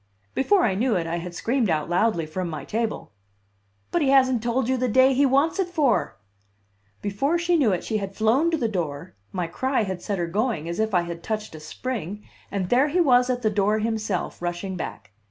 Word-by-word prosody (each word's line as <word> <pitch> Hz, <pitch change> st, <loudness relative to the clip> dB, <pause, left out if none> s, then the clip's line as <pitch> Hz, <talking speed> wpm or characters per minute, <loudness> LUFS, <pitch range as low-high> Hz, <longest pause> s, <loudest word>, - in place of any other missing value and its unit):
Before 380 Hz, +8 st, +3 dB
I 205 Hz, -, +2 dB
knew 225 Hz, +4 st, +1 dB
it 170 Hz, -3 st, 0 dB
I 165 Hz, +1 st, -2 dB
had 175 Hz, 0 st, -6 dB
screamed 235 Hz, 0 st, 0 dB
out 155 Hz, -2 st, 0 dB
loudly 175 Hz, -1 st, +1 dB
from 175 Hz, +3 st, -4 dB
my 155 Hz, -, -6 dB
table: 225 Hz, -, -3 dB, 0.8 s
"But 345 Hz, -, +1 dB
he 280 Hz, -, +2 dB
hasn't 260 Hz, -3 st, +4 dB
told 240 Hz, +1 st, 0 dB
you 260 Hz, -, +2 dB
the 255 Hz, 0 st, 0 dB
day 260 Hz, +3 st, +5 dB
he 275 Hz, +2 st, +4 dB
wants 280 Hz, +8 st, +2 dB
it 380 Hz, -, +1 dB
for!" 305 Hz, -8 st, +1 dB, 0.9 s
Before 270 Hz, +12 st, 0 dB
she 340 Hz, +1 st, +1 dB
knew 270 Hz, -10 st, +3 dB
it 180 Hz, -, -1 dB
she 220 Hz, -, -1 dB
had 195 Hz, -1 st, -5 dB
flown 235 Hz, +10 st, +3 dB
to 330 Hz, -, 0 dB
the 240 Hz, -, 0 dB
door 165 Hz, -9 st, -4 dB, 0.2 s
my 180 Hz, -2 st, -2 dB
cry 260 Hz, +9 st, 0 dB
had 190 Hz, -3 st, -4 dB
set 200 Hz, +1 st, -2 dB
her 175 Hz, -, -1 dB
going, 190 Hz, -2 st, -1 dB
as 170 Hz, +3 st, -4 dB
if 220 Hz, -2 st, 0 dB
I 175 Hz, -, +4 dB
had 170 Hz, -1 st, -6 dB
touched 215 Hz, -1 st, -4 dB
a 155 Hz, -, -8 dB
spring 210 Hz, +3 st, -5 dB, 0.3 s
and 190 Hz, -3 st, -2 dB
there 260 Hz, +4 st, +4 dB
he 325 Hz, +5 st, 0 dB
was 250 Hz, -6 st, +4 dB
at 250 Hz, -1 st, -1 dB
the 215 Hz, -, +2 dB
door 205 Hz, +1 st, +2 dB
himself, 215 Hz, -5 st, -2 dB
rushing 175 Hz, +2 st, -3 dB
back. 105 Hz, -, -7 dB
220 Hz, 220 wpm, -24 LUFS, 180-260 Hz, 0.9 s, day